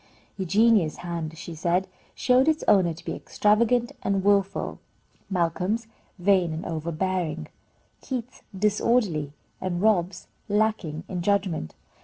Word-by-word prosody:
Eugenia's 200 -2 +3
hand, 165 -2 -4
she 170 - -7
said, 175 +4 0 0.3
showed 255 +2 +3
its 315 -1 +2
owner 185 -4 +5
to 165 +2 -10
be - - -3
extravagant 235 +3 +2
and 195 -1 0
wilful; 200 -1 +1 0.5
Malcolm's, 190 +5 0 0.3
vain 185 -2 +3
and 160 - -5
overbearing; 165 - -2 0.5
Keith's, 250 -2 -5 0.2
disorderly; 205 - +1 0.3
and 175 -2 -2
Rob's, 190 -3 +1 0.2
lacking 205 -7 0
in 180 -2 -3
judgment. 190 - 0
190 Hz, 115 wpm, -26 LUFS, 170-215 Hz, 0.5 s, owner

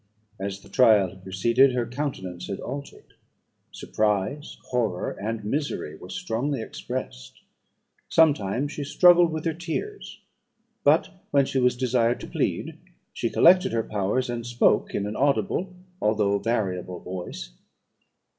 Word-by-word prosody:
As 100 0 -4
the 100 - -16
trial 105 -3 +5
had 95 +1 -15
proceeded, 115 +8 +3
her 120 -1 0
countenance 120 -9 -5
had 100 - -4
altered. 140 +2 -8 0.6
Surprise, 110 +8 -2
horror, 110 -8 0
and 110 +1 -5
misery 140 - -2
were 90 - -12
strongly 115 +10 -2
expressed. 130 +2 -6 0.7
Sometimes 145 -4 +2
she 145 - -5
struggled 175 +3 +5
with 155 0 -4
her 165 - +1
tears; 175 - -5 0.6
but, 155 +6 +4 0.2
when 140 -1 +3
she 135 - -1
was 125 -1 +2
desired 120 -1 +1
to - - -7
plead, - - -2 0.3
she - - -2
collected 185 +2 +5
her 115 -1 +1
powers, 105 +6 -1
and 120 -1 -4
spoke, 120 0 +2
in 100 - -1
an 105 +1 -4
audible, 145 +6 0 0.3
although 105 -2 +2
variable 95 -5 -2
voice. 90 -9 -7
120 Hz, 135 wpm, -25 LUFS, 100-140 Hz, 0.7 s, trial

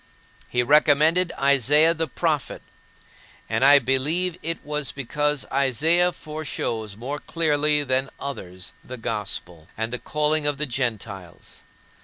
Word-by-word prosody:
He 125 0 +1
recommended 155 +5 +4
Isaiah 140 +4 +4
the 165 -1 -2
prophet; 155 -4 -2 0.8
and - - 0
I 140 +1 +8
believe 145 +7 +1
it 165 +1 -2
was 150 -3 -2
because 145 +2 -1
Isaiah 155 +7 +3
foreshows 120 - -5
more 135 +6 -5
clearly 150 -2 +1
than 130 0 0
others 95 -10 -6
the 125 - -8
gospel, 100 -8 -5
and 110 +2 -3
the 125 - -2
calling 150 0 0
of 145 -1 0
the 150 - 0
Gentiles. 110 -8 -5
140 Hz, 125 wpm, -24 LUFS, 120-150 Hz, 0.8 s, I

